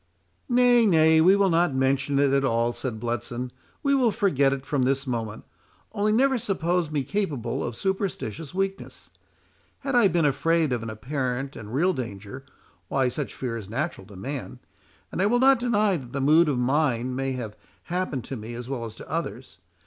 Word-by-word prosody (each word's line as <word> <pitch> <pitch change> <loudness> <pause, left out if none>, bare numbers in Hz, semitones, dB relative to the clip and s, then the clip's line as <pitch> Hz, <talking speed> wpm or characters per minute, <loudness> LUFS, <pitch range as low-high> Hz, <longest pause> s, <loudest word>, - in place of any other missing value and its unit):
"Nay, 245 -2 +5
nay, 160 -3 +5
we 185 +4 +6
will 200 -2 +3
not 165 -4 +2
mention 135 +1 +1
it 140 -1 +3
at 140 0 +3
all," 115 -2 +1
said 120 -4 -4
Bletson, 120 +2 -3 0.3
"we 280 -1 +3
will 260 -4 +4
forget 190 - +2
it 135 0 -3
from 145 -2 0
this 135 +2 +1
moment. 115 -4 -4 0.5
Only, 210 0 +1
never 260 +3 +3
suppose 180 -4 0
me 150 -3 -1
capable 145 - -2
of 120 - -4
superstitious 180 - -3
weakness. 195 +1 -4 0.7
Had 275 0 -3
I 240 -4 +6
been 170 -4 +1
afraid 155 +1 +2
of 120 - -1
an 115 - -5
apparent 130 +3 -3
and 105 -1 -9
real 175 +9 +2
danger—why 130 - -5
such 135 +3 -5
fear 125 -3 -3
is 105 -4 -7
natural 135 - -3
to 100 - -13
man—and 135 - -8
I 200 - +3
will 240 +3 +3
not 265 0 +5
deny 215 -5 +2
that 125 -5 -10
the 140 - -2
mood 155 +4 +5
of 140 - 0
mind 130 -1 +1
may 135 0 -1
have 115 -5 -5 0.3
happened 175 -8 -2
to 135 - -6
me 115 +1 -7
as 120 0 -7
well 130 -3 -3
as 110 -1 -8
to - - -11
others. 140 - -5
140 Hz, 185 wpm, -25 LUFS, 125-185 Hz, 0.7 s, we